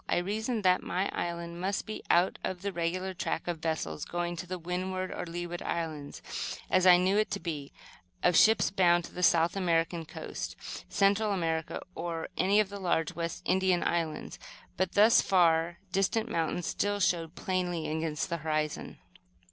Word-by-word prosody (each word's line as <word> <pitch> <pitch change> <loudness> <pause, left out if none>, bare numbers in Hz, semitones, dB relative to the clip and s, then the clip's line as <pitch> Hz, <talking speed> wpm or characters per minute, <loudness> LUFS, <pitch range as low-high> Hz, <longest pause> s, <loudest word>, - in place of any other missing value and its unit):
I - - +2
reasoned 215 +5 -1
that 185 -1 +4
my 185 +2 -1
island 170 0 -4
must 195 +2 -1
be 215 - -6
out 175 +2 +3
of 185 0 -4
the 200 -1 -2
regular 180 +3 -2
track 180 - -3
of 170 -2 -2
vessels 155 - -2
going 175 0 -3
to 180 - -6
the 185 +1 -3
Windward 185 +2 -3
or - - -5
Leeward 175 +1 -5
Islands, 155 -4 -4 0.5
as 185 0 +4
I 180 -1 +9
knew 190 +3 +3
it 215 - +1
to 200 - -2
be, 150 -6 -5 0.5
of 180 - +4
ships 220 -4 +5
bound 175 -2 +4
to - - -10
the 180 - -5
South 170 0 +4
American 170 -2 0
coast, - - -6 0.3
Central 205 +2 +3
America 165 -4 -1
or 165 -1 -4
any 200 +3 +3
of 210 -2 +2
the 200 0 -7
large 170 -2 0
West 170 0 -4
India 185 -1 +3
Islands. 165 -3 -2 0.4
But 185 0 -1
the 215 +3 +6
far 170 -5 +4
distant 215 +5 +1
mountains 165 +1 -1
still 205 0 -1
showed 170 -3 +1
plainly 175 -4 -1
against 155 -1 -2
the 170 - -2
horizon. 155 -1 -2
175 Hz, 170 wpm, -30 LUFS, 165-190 Hz, 0.5 s, I